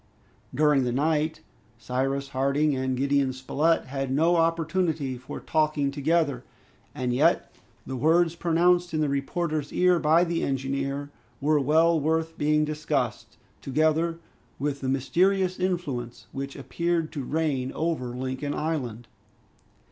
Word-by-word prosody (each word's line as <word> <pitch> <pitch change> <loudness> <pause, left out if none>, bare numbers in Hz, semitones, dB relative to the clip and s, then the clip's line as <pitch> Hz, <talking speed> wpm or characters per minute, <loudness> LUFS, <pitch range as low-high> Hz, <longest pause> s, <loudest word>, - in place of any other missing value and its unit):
During 150 0 +3
the 125 - 0
night, 155 +4 0 0.4
Cyrus 135 +3 -2
Harding 140 +2 +1
and 130 -1 -1
Gideon 140 0 +1
Spilett 150 +5 +1
had 135 0 -3
no 165 +6 +3
opportunity 165 -4 0
for 125 +1 -8
talking 155 -3 0
together, 145 -2 0 0.5
and 125 -1 -1
yet 155 +7 +2 0.3
the 130 - -5
words 165 +5 +3
pronounced 175 0 +2
in 155 - +1
the 150 - +1
reporter's 150 +2 -2
ear 180 -1 +3
by 160 +2 +4
the 170 -1 -1
engineer 135 +1 -2 0.3
were 150 +1 +2
well 160 +4 +3
worth 160 +2 0
being 150 0 +2
discussed, 150 -5 -2 0.2
together 160 +4 +1 0.4
with 140 0 -2
the 130 - -2
mysterious 185 +8 +1
influence 145 -10 -3
which 135 0 -5
appeared 170 +3 -1
to 145 -4 -4
reign 140 -3 -1
over 160 -6 -1
Lincoln 130 +3 -3
Island. 125 -8 -3
150 Hz, 130 wpm, -26 LUFS, 135-165 Hz, 0.5 s, by